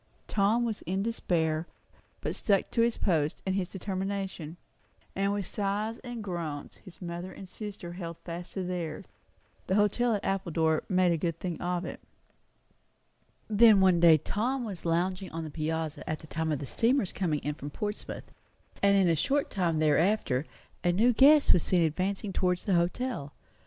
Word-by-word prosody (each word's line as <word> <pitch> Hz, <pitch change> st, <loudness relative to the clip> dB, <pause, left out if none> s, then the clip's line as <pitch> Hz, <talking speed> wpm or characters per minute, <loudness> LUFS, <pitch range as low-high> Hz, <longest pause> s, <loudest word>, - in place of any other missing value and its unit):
Tom 215 Hz, +4 st, +2 dB
was 220 Hz, -3 st, -3 dB
in 190 Hz, +2 st, 0 dB
despair, 165 Hz, -7 st, 0 dB, 0.5 s
but -, -, -3 dB
stuck 200 Hz, -3 st, +1 dB
to 230 Hz, -, +2 dB
his 235 Hz, 0 st, +2 dB
post 155 Hz, -5 st, 0 dB
and 190 Hz, -, 0 dB
his 190 Hz, -2 st, -1 dB
determination; 190 Hz, -3 st, -4 dB, 0.6 s
and 195 Hz, +1 st, +1 dB
with 200 Hz, -1 st, -2 dB
sighs 210 Hz, +4 st, -2 dB
and 240 Hz, -3 st, -7 dB
groans 165 Hz, -7 st, -5 dB
his 185 Hz, 0 st, -13 dB
mother 175 Hz, +2 st, -5 dB
and 195 Hz, -, -10 dB
sister 200 Hz, -3 st, -7 dB
held 170 Hz, -2 st, -6 dB
fast 175 Hz, +1 st, -7 dB
to 190 Hz, -, -2 dB
theirs. 175 Hz, -3 st, -4 dB, 0.6 s
The 190 Hz, -, +1 dB
hotel 215 Hz, +3 st, +3 dB
at 200 Hz, -, -4 dB
Appledore 165 Hz, -5 st, +1 dB
made 185 Hz, -2 st, +3 dB
a 170 Hz, -, +2 dB
good 165 Hz, 0 st, -2 dB
thing 175 Hz, -3 st, -4 dB
of 180 Hz, 0 st, -1 dB
it. -, -, -6 dB, 1.5 s
Then 215 Hz, -1 st, +6 dB
one 185 Hz, -2 st, +5 dB
day 165 Hz, -2 st, +7 dB
Tom 245 Hz, -, -2 dB
was 195 Hz, -6 st, -6 dB
lounging 185 Hz, +3 st, 0 dB
on 165 Hz, 0 st, -4 dB
the 155 Hz, -, -6 dB
piazza 160 Hz, -1 st, -3 dB
at 155 Hz, -, -1 dB
the -, -, -13 dB
time 160 Hz, +1 st, -2 dB
of 150 Hz, -, +1 dB
the 140 Hz, -, -6 dB
steamer's 230 Hz, -, +1 dB
coming 170 Hz, -6 st, 0 dB
in 150 Hz, -, -2 dB
from 145 Hz, 0 st, -7 dB
Portsmouth; 210 Hz, +7 st, -5 dB, 0.6 s
and 200 Hz, 0 st, +5 dB
in 190 Hz, -2 st, +4 dB
a 165 Hz, -, +3 dB
short 280 Hz, -, 0 dB
time 175 Hz, -5 st, 0 dB
thereafter 155 Hz, -2 st, +2 dB, 0.4 s
a 175 Hz, -, +3 dB
new 225 Hz, +7 st, +4 dB
guest 285 Hz, +4 st, +7 dB
was 175 Hz, -, +3 dB
seen 175 Hz, 0 st, +2 dB
advancing 190 Hz, +5 st, -1 dB
towards 180 Hz, -1 st, 0 dB
the 195 Hz, -, 0 dB
hotel. 175 Hz, -, -1 dB
185 Hz, 175 wpm, -29 LUFS, 165-205 Hz, 1.5 s, day